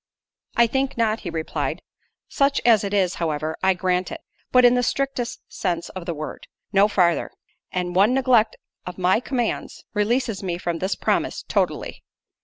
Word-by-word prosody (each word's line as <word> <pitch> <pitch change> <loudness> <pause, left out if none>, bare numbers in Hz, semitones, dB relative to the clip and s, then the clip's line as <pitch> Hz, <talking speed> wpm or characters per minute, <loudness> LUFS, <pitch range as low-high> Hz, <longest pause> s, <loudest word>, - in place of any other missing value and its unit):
"I 235 - +6
think 265 +2 -1
not," 225 -1 +1
he - - -6
replied: 160 -1 -3 0.4
"such 275 -1 +2
as 225 -4 +5
it 200 - -3
is, 190 -3 +2
however, 155 -1 -1
I 190 0 +3
grant 180 0 0
it: - - -6 0.3
but 250 -1 +6
in 245 - +7
the 250 - +2
strictest 260 -1 -2
sense 170 -3 -3
of 185 -1 -8
the 170 - -2
word—no 195 +6 -1
farther—and 180 -1 -1
one 205 +7 +4
neglect 250 -4 +3 0.3
of 180 - -6
my 185 +3 +3
commands, 245 -2 -3
releases 225 0 0
me 180 -3 -2
from 170 -2 -3
this 190 +4 -1
promise - - -1
totally." - - -1
200 Hz, 160 wpm, -23 LUFS, 180-240 Hz, 0.4 s, in